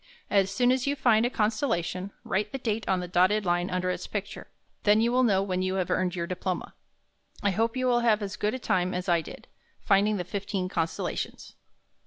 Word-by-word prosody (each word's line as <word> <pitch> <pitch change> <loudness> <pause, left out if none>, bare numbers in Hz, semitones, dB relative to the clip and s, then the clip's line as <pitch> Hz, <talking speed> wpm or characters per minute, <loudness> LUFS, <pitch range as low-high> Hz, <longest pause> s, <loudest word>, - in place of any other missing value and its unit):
As 195 -2 +3
soon 245 +5 +2
as 260 +1 0
you 285 - +1
find 235 -4 +3
a - - -2
constellation, 210 - -1
write 210 +2 -1
the - - -3
date 225 -4 -2
on 185 -1 +2
the 180 - -5
dotted 185 +4 +3
line 175 +1 +1
under 185 0 0
its - - -5
picture. - - -5 0.3
Then 210 +1 +4
you 235 +2 +2
will 255 +1 +3
know 200 -6 +3
when 185 -2 -1
you 185 0 -1
have 185 -2 -1
earned 185 -1 0
your 170 -1 -2
diploma. 185 +1 -4 0.7
I 200 - +3
hope 225 +5 0
you 255 - 0
will 245 -1 +3
have 220 -3 +2
as 195 - -4
good 210 +4 -1
a - - -2
time 185 -7 0
as 180 +1 -3
I 170 -2 +3
did, - - -11 0.3
finding 205 +1 +2
the 180 - -2
fifteen 195 0 -3
constella 165 -3 -2
tions. - - -6
195 Hz, 220 wpm, -27 LUFS, 185-225 Hz, 0.7 s, Then